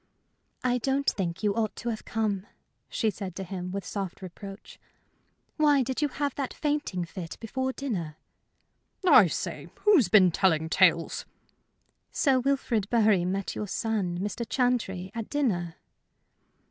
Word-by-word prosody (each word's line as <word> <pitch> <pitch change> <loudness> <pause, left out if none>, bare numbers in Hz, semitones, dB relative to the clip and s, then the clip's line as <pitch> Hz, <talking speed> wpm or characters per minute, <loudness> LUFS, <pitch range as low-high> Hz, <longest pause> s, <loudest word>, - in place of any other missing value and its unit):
"I 250 0 +2
don't 275 +3 0
think 185 0 -1
you 205 -1 +2
ought 220 -1 -1
to 240 - -4
have 220 -2 -4
come," 210 -3 -1 0.4
she 220 -3 0
said 190 -2 -7
to 195 - -4
him, 180 -1 -5
with 200 0 -4
soft 195 -2 -5
reproach. 195 +2 -10 0.8
"Why 295 -3 +4
did 260 +4 -3
you 295 - +3
have 285 0 -2
that 275 -3 -4
fainting 290 - -1
fit 170 0 -7
before 260 +4 -2
dinner?" 185 - -4 0.9
"I - - +8
say! - - -4
Who's 360 - +5
been 185 -3 +6
telling 160 -3 +2
tales?" 170 -2 +3 0.8
"Sir 270 -3 +3
Wilfrid 250 -6 0
Bury 215 -6 +4
met 195 +1 -2
your 210 - -4
son, 200 -4 -1
Mr. 205 +5 -3
Chantrey, 225 -8 0
at 230 -2 -5
dinner." 185 - 0
210 Hz, 145 wpm, -28 LUFS, 185-255 Hz, 0.9 s, I